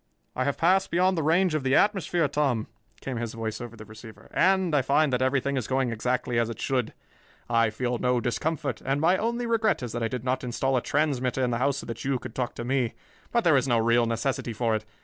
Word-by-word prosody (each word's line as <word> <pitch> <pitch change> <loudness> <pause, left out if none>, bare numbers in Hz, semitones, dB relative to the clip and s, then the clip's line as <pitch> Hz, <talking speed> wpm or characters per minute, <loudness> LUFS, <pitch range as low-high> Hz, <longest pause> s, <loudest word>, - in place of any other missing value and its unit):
"I - - 0
have 140 - -1
passed 190 +3 +3
beyond 185 +2 +2
the 165 - 0
range 165 +3 +2
of 155 - 0
the 130 +1 +2
atmosphere, 185 -5 +2
Tom," 135 -6 0 0.4
came 130 -3 -4
his 115 -1 -4
voice 110 -1 -4
over 120 -1 -8
the 110 -1 -11
receiver, 110 +1 -13
"and 190 -3 +3
I 140 - +4
find 140 +2 +2
that 125 - +1
everything 135 +1 +1
is 125 - -2
going 130 -2 0
exactly 125 +1 -1
as 115 -1 0
it 115 - -7
should. 125 -4 -1 0.5
I 115 -1 +3
feel 120 +2 -2
no 125 -1 +2
discomfort, 150 +6 -2
and 135 +2 0
my 170 +5 +4
only 235 +4 -1
regret 220 - +1
is 120 - -4
that 120 - -4
I 115 - +1
did 125 +1 -5
not 130 +1 -1
install 130 +2 -1
a 125 - +2
transmitter 135 -4 0
in 125 - +1
the 120 - -1
house 140 +1 +1
so - - -6
that 115 -1 -6
you 135 -1 0
could 110 - -9
talk 125 -1 -3
to 120 - -5
me; 125 -2 0 0.4
but 235 -1 +2
there 160 -4 +5
is 135 - +1
no 120 -2 +3
real 115 +1 +3
necessity 115 +1 -2
for 115 +1 0
it. 110 0 -2
130 Hz, 245 wpm, -26 LUFS, 120-150 Hz, 0.5 s, there